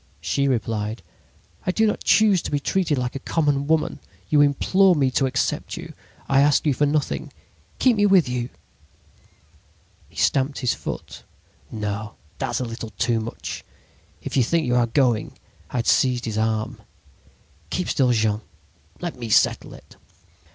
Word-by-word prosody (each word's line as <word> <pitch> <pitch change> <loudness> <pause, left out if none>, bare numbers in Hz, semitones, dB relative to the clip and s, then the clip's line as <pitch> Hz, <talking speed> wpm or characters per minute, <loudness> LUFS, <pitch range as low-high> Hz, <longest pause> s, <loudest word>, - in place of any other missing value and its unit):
"She 140 0 0
replied: 110 -3 -2 0.6
"'I - - +3
do 220 - +3
not 210 - -1
choose 210 -5 +4
to - - -5
be 145 - 0
treated 160 -1 0
like 125 0 -2
a - - -3
common 145 -2 0
woman. 160 0 +1 0.3
You 150 -1 +5
implored 180 +6 +4
me 135 -2 +2
to 135 +1 +2
accept 130 - -2
you. - - -8 0.3
I 135 0 +4
asked 145 +1 +3
you 145 - +3
for 145 +3 +1
nothing. 150 0 -1 0.5
Keep 250 -4 +3
me 205 0 +4
with 190 -6 +5
you!' 125 0 -2 1.6
"He - - -23
stamped 135 +1 +1
his 125 - +1
foot. - - -7 0.5
"'No, 105 -1 -4 0.2
that's - - -1
a 130 - -2
little 115 -1 -6
too 115 -2 +1
much! 110 +1 -6 0.6
If - - -5
you 135 - +4
think 160 +6 +1
you 125 - 0
are 120 -1 +3
going—' 120 -3 +1 0.3
"I - - -9
had 120 -1 0
seized 125 -2 +2
his 110 -2 -3
arm. 110 0 -1 0.9
"'Keep 180 - -2
still, 130 -3 +2
Jean... 110 -2 +1 0.6
Let 175 -2 -4
me 115 -2 -5
settle - - +2
it.' - - -17
135 Hz, 165 wpm, -23 LUFS, 115-150 Hz, 1.6 s, You